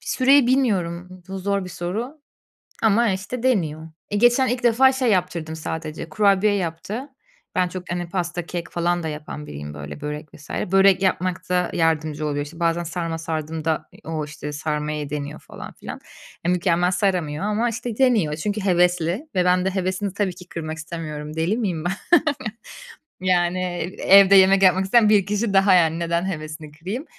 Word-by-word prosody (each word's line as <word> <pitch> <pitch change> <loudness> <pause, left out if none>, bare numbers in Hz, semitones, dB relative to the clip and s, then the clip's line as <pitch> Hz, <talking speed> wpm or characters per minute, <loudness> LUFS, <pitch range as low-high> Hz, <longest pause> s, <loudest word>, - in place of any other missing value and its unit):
süreyi 270 0 +4
bilmiyorum. 185 -8 0
Bu, 195 0 -5
zor 200 0 -1
bir 180 - -8
soru 220 - -4 0.6
ama, 220 +1 +4
işte, 210 +6 -4
deniyor. 160 -11 0 0.2
E, 205 - -1
geçen 240 +4 +4
ilk 245 0 -2
defa 245 +3 +5
şey 260 -3 0
yaptırdım 175 -4 -1
sadece, 160 0 -5
kurabiye 205 0 +3
yaptı. 200 - -4 0.5
Ben 180 -1 +2
çok, 180 0 -7
hani, 175 -1 -3
pasta, 175 -2 -3
kek 170 -1 -5
falan 175 0 0
da 160 - -2
yapan 150 0 -7
biriyim, 75 +1 -7
böyle, 75 0 -8
börek 150 +1 -6
vs. 150 - -15
Börek 195 +1 +3
yapmakta 185 -1 0
yardımcı 155 -2 0
oluyor. 145 0 -2
İşte, 165 +3 -12
bazen 170 0 +1
sarma 165 -1 -3
sardığımda, 160 -1 -3
eee, - - -16
o, 160 -2 -3
işte, 150 0 -7
sarmayı 150 -1 -3
deniyor 150 +1 -5
falan - - -10
filan. - - -9 0.4
Ya, 175 - +3
mükemmel 180 -1 +2
saramıyor 180 -4 0
ama, 215 +3 +1
işte, 230 0 -5
deniyor, 220 - +3
çünkü 210 +4 -2
hevesli 180 - +1
ve 180 0 +2
ben 180 0 +3
de - - +2
hevesini 190 +1 -2
tabii 195 -3 -1
ki 180 0 -13
kırmak 160 -1 -5
istemiyorum. 155 -1 -6
Deli 170 +8 0
miyim 180 -9 -2
ben? 180 - +1 1.3
Yani, 180 -1 +1 0.4
evde 195 0 +7
yemek 190 +1 +6
yapmak 190 0 +5
isteyen 215 +2 +4
bir 205 -3 +4
kişi 210 +1 -1
daha, 195 0 +5
yani, 165 -2 +3
neden 170 +1 0
hevesini 155 -2 -7
kırayım? 190 - -5
180 Hz, 170 wpm, -22 LUFS, 160-200 Hz, 1.3 s, evde